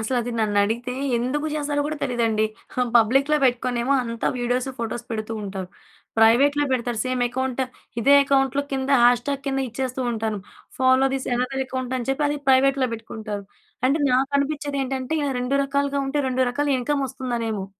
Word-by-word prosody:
అసలది 240 +1 -1
నన్నడిగితే 220 +4 +1 0.3
ఎందుకు 285 +6 -1
చేస్తారో 290 -1 -1
కూడా 310 0 -3
తెలీదండి. 230 -3 +1 0.4
ఆ! - - +4
పబ్లిక్‌లో 270 +7 +4
పెట్టుకునేమో 245 +1 +1
అంతా 230 -1 -3
వీడియోస్ 245 +1 0
ఫోటోసు 230 0 -4
పెడుతూ 215 0 -3
ఉంటారు. 190 -2 -5 0.5
ప్రైవేట్‌లో 275 +6 +5
బెడతారు. 240 -2 -1
సేమ్ 255 -1 -1
అకౌంట్ 260 +1 -2 0.4
ఇదే 280 +5 +6
అకౌంట్‌లో 275 0 +2
కింద 265 0 -1
హ్యాష్ 245 0 +4
ట్యాగ్ 280 -1 -2
కింద 270 0 0
ఇచ్చేస్తూ 255 +2 -3
ఉంటాను. 220 -2 -2 0.4
ఫాలో 260 +1 +4
దిస్ 270 - -3
యనదర్ 255 +2 -1
అకౌంట్ 255 -1 -3
అని 245 - -6
చెప్పి, 290 +2 0
అది 295 0 -2
ప్రైవేట్‌లో 265 0 +4
పెట్టుకుంటారు. 215 -2 -6 0.4
అంటే 285 +4 +2
నాకనిపించేది 280 +2 0
ఏంటంటే 260 +2 -3
ఇల 285 - 0
రెండు 250 +2 -1
రకాలుగా 280 0 0
ఉంటే 280 +2 -1
రెండు 260 0 +1
రకాల 290 +4 -1
ఇన్కమ్ 280 +3 0
వస్తుందనేమో! 235 -6 -3
255 Hz, 155 wpm, -23 LUFS, 235-275 Hz, 0.5 s, ఇదే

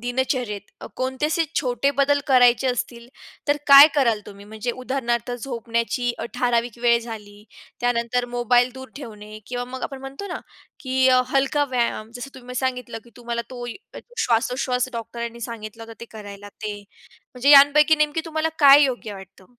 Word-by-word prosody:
दिनचर्येत 245 -4 -2 0.3
कोणते 260 +3 -1
असे 325 +2 +1 0.2
छोटे 255 +2 0
बदल 285 +1 +3
करायचे 250 -1 +4
असतील, 240 -1 -3 0.4
तर 290 - +3
काय 280 +1 +11
कराल 235 -7 +2
तुम्ही, 200 0 -12
म्हणजे 220 +3 -4
उदाहरणार्थ 245 -2 -2
झोपण्याची 240 0 -2
अ, - - -4
ठराविक 240 -1 0
वेळ 235 -1 +4
झाली, 210 -3 -10 0.4
त्यानंतर 245 0 0
मोबाईल 245 +1 +3
दूर 260 0 -9
ठेवणे 215 -5 -10
किंवा 245 0 -4
मग 255 +1 -8
आपण 270 -1 -5
म्हणतो 270 +9 -8
ना, 350 - -4 0.4
की 260 -1 +2
अ, 255 -1 +5
हलका 275 +2 +1
व्यायाम, 235 -3 -1
जसं 270 +2 -8
तुम्ही 250 0 -10
सांगितलं, 250 -2 -3
की 235 - -18
तुम्हाला 235 -1 -4
तो 245 -1 -7 0.5
श्वासोश्वास 250 +2 0
डॉक्टरांनी 235 0 -6
सांगितला 225 0 -8
होता 225 0 -10
ते 235 - -6
करायला 205 -2 -10
ते, 210 0 -7 0.6
म्हणजे 255 +2 +1
यांपैकी 290 +2 +7
नेमकी 300 +1 0
तुम्हाला 320 0 -1
काय 285 0 +8
योग्य 245 -6 -2
वाटतं? 190 -1 -13
245 Hz, 155 wpm, -23 LUFS, 230-265 Hz, 0.6 s, काय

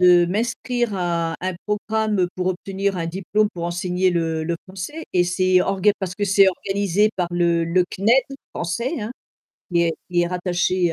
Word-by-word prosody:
de 175 -1 +6
m'inscrire 235 +3 -1
à 170 -2 -1
à 185 - -2
un - - -7
programme 210 -2 0
pour 185 0 -1
obtenir 195 +1 -2
un 165 - -2
diplôme 195 +5 0
pour 170 - -5
enseigner 180 +1 0
le 165 -2 -1
le 170 +1 -2
français 195 - -6
et 180 - +4
c'est 185 +1 +3
orga 195 +2 +2
parce 185 -1 -4
que 205 - 0
c'est 195 0 +5
organisé 200 +2 +1
par 175 -2 -1
le 170 -1 +2
le 175 +2 +2
CNED, 225 +7 +3 0.3
français, 235 - -2
hein. 215 +3 -4 0.6
Qui 170 - +3
est 165 -1 +2 0.2
qui 175 - +2
est 175 - +2
rattaché, 180 0 0
185 Hz, 180 wpm, -22 LUFS, 175-200 Hz, 0.6 s, de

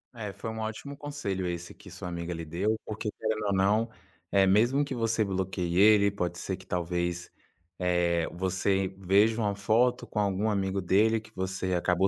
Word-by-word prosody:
É, 105 -4 -5
foi 110 - -6
um 110 - -6
ótimo 110 +6 -5
conselho 140 -11 -3
esse 85 0 -5
que - - -14
sua - - -7
amiga 85 0 -4
lhe 80 - -6
deu, 100 +8 -1
porque 110 0 -4
querendo 110 -1 -1
ou 100 - +1
não, 105 +4 +2 0.4
é, 100 -1 +5
mesmo 120 +9 +3
que 135 - -5
você 115 -2 +1
bloqueie 95 -2 -2
ele, 100 -1 +6
pode 90 -3 -3
ser 95 +1 -3
que 95 - -16
talvez, 85 0 -2 0.5
eh, 85 -2 +1
você 95 +1 0
veja 100 +4 +3
uma 100 -2 0
foto 120 +5 +2
com 105 - -3
algum 100 +1 +1
amigo 95 -1 0
dele 105 +5 +3
que 110 - -16
você 95 0 -2
acabou 90 +2 +2
95 Hz, 185 wpm, -29 LUFS, 90-110 Hz, 0.5 s, ele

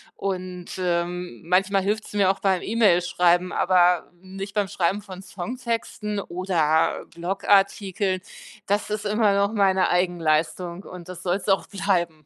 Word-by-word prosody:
und, 185 -2 -4
ähm, 175 -5 -2
manchmal 195 +2 +2
hilft‘s 210 +2 -2
mir 195 -2 +4
auch 195 - -7
beim 190 -2 +1
E-Mail-Schreiben, 180 -4 +3
aber 180 -1 +3
nicht 195 +2 -8
beim 205 -2 +1
Schreiben 195 +1 -1
von 190 -2 -9
Songtexten 220 0 -4
oder 170 -4 0
Blog-Artikeln. 195 +1 +1 0.4
Das 205 +1 0
ist 210 0 -3
immer 210 -1 +2
noch 200 +2 +1
meine 190 -2 +3
Eigenleistung 175 0 0
und 180 -2 -10
das 185 0 -8
soll‘s 180 +1 -2
auch 195 -1 +2
bleiben. 175 -6 -1
185 Hz, 130 wpm, -24 LUFS, 175-200 Hz, 0.4 s, mir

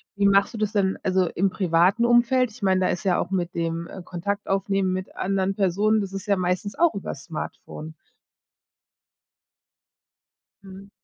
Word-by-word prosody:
wie 200 0 +3
machst 200 +3 +3
du - - -6
das 215 -1 -1
denn 195 -2 +1
also 185 -1 +2
im 195 +3 0
privaten 185 +5 +2
Umfeld? 240 +1 +3
Ich 220 +1 -15
meine, 190 -1 +2
da 185 - +3
ist 175 - -2
ja 185 -3 +2
auch - - -3
mit 175 -2 -1
dem 165 0 -2 0.2
Kontakt 200 +4 -4
aufnehmen 195 -1 0
mit 185 0 -5
anderen 195 0 -1
Personen, 210 +3 +2
das 195 -1 -5
ist 195 +1 -6
ja 200 - +3
meistens 185 +2 -2
auch 340 -5 +4
übers 150 -7 -6
Smartphone? 155 -1 -7 2.7
Mhm. 195 +1 -12
195 Hz, 165 wpm, -24 LUFS, 180-205 Hz, 2.7 s, auch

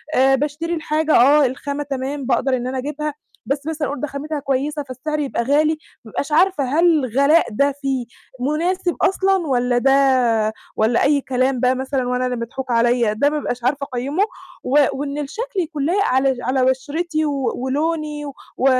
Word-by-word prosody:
آآ، 270 +1 +5
باشتري 300 +5 -2
الحاجة 310 -1 0
آه، 280 +4 +6
الخامة 280 +3 -3
تمام 275 0 -4
باقدر 260 +1 +1
إن 245 0 -3
أنا 260 +1 -3
أجيبها، 295 +3 -3 0.3
بس 275 +1 -2
مثلًا 315 -2 -2
أقول 285 - -4
ده 295 - -1
خامتها 290 +2 -4
كويسة، 285 +2 -1
فالسعر 280 +3 -4
يبقى 275 -4 -1
غالي، 305 +5 +2 0.3
بابقاش 280 +7 -4
عارفة 345 0 +3
هل 295 +7 +2
الغلاء 280 +5 +3
ده 280 +6 +2
فيه 265 -3 -1 0.3
مُناسب 340 +7 0
أصلًا، 385 0 +3
والّا 245 -2 +1
ده 250 -4 +3 0.2
والّا 225 +2 +2
أي 285 0 +3
كلام 255 0 0
بقى 255 +1 +2
مثلًا، 265 -1 -2
وأنا 250 0 0
اللي 250 0 -1
مضحوك 245 +2 -5
عليّا، 235 -1 +2
ده 285 +7 +2
بابقاش 285 -5 -3
عارفة 280 +3 0
أقيّمُه، 275 +10 0 0.4
و 285 +3 +3
وإن 280 +1 -4
الشكل 395 - -4
يكون 305 -5 -2
لايق 390 +6 +2
على 265 0 +2
على 255 +1 +1
بشرتي 310 +5 -1
و 280 -3 -1
ولوني، 300 +3 -2
و 285 - -7 0.2
و 255 - 0
275 Hz, 170 wpm, -20 LUFS, 255-300 Hz, 0.4 s, آه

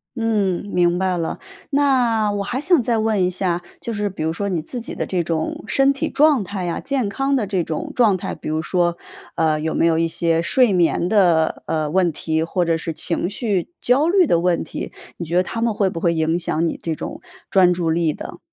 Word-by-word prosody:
嗯， 215 -6 0
明 175 0 +2
白 185 0 0
了。 165 -1 -3 0.3
那 250 -7 +2
我 205 -1 -2
还 245 +6 -3
想 320 0 +3
再 235 -1 0
问 220 -2 +1
一 180 - +2
下， 180 -1 -1 0.2
就 235 - -5
是 205 -1 -1
比 185 - -6
如 160 +1 0
说 200 +4 -3
你 175 -4 -1
自 245 +9 -6
己 230 - -6
的 - - -2
这 180 -2 -1
种 160 -1 -3
身 275 +2 +3
体 275 - -2
状 290 -5 +3
态 190 -2 -4
啊， 170 - -2
健 270 -5 -1
康 270 +6 0
的 245 -6 0
这 190 -3 -1
种 160 -1 -4
状 220 -6 +4
态， - - -5
比 - - -7
如 155 +1 -1
说， 175 +1 0 0.4
呃， 155 -2 +1
有 160 +1 -2
没 - - +2
有 165 -1 +3
一 165 - +2
些 165 0 0
睡 210 +6 +3
眠 175 -1 +2
的， 175 -6 +2
呃， 155 -1 -1
问 180 -1 +2
题， 160 +1 -2
或 175 +2 -1
者 165 -1 +1
是 165 0 -4
情 170 +3 0
绪 205 -4 -2
焦 270 +6 +2
虑 375 0 +4
的 170 - +2
问 175 0 +1
题， - - -6 0.3
你 170 - -5
觉 165 +2 -3
得 180 - +4
它 225 +5 -5
们 230 0 +2
会 200 -1 +1
不 170 - -5
会 170 0 +1
影 160 +1 +1
响 165 -1 0
你 - - -4
这 165 -1 -2
种 - - -7 0.3
专 185 -2 +5
注 175 -2 -1
力 165 -1 +1
的？ - - -8
180 Hz, 250 characters per minute, -20 LUFS, 165-225 Hz, 0.4 s, 专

